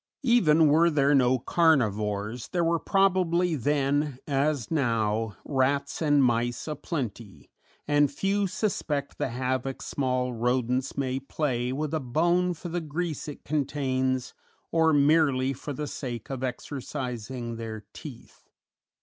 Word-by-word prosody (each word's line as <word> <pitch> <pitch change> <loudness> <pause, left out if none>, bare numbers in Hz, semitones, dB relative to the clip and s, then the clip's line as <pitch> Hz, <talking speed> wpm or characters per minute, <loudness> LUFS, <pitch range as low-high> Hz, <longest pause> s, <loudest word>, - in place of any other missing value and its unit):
Even 165 - +5
were 160 +4 +5
there 145 -2 +3
no 130 -2 +4
carnivores, 110 - +1
there 175 -2 0
were 165 0 +2
probably 180 -3 +2
then, 145 0 0
as 140 -2 0
now, 115 -6 0
rats 140 +1 0
and 145 -3 +4
mice 120 +1 0
a 155 - -2
plenty, 115 - -6 0.4
and 145 -1 +3
few 195 +6 0
suspect 150 -8 -2
the - - 0
havoc 130 +2 -2
small 125 -2 -1
rodents 125 +2 0
may 130 -1 -1
play 130 -3 -2
with 150 +3 -3
a 160 - +1
bone 175 +7 +1
for 175 +2 -7
the 175 +1 -2
grease 160 0 -4
it 145 - -9
contains, 130 -3 -1 0.4
or 160 -1 +4
merely 140 -3 +3
for 140 +3 -7
the 150 +2 -4
sake 125 -5 -6
of 130 -1 -4
exercising 125 -3 -5
their 110 -2 -6
teeth. 135 -7 -12
140 Hz, 130 wpm, -27 LUFS, 125-155 Hz, 0.4 s, Even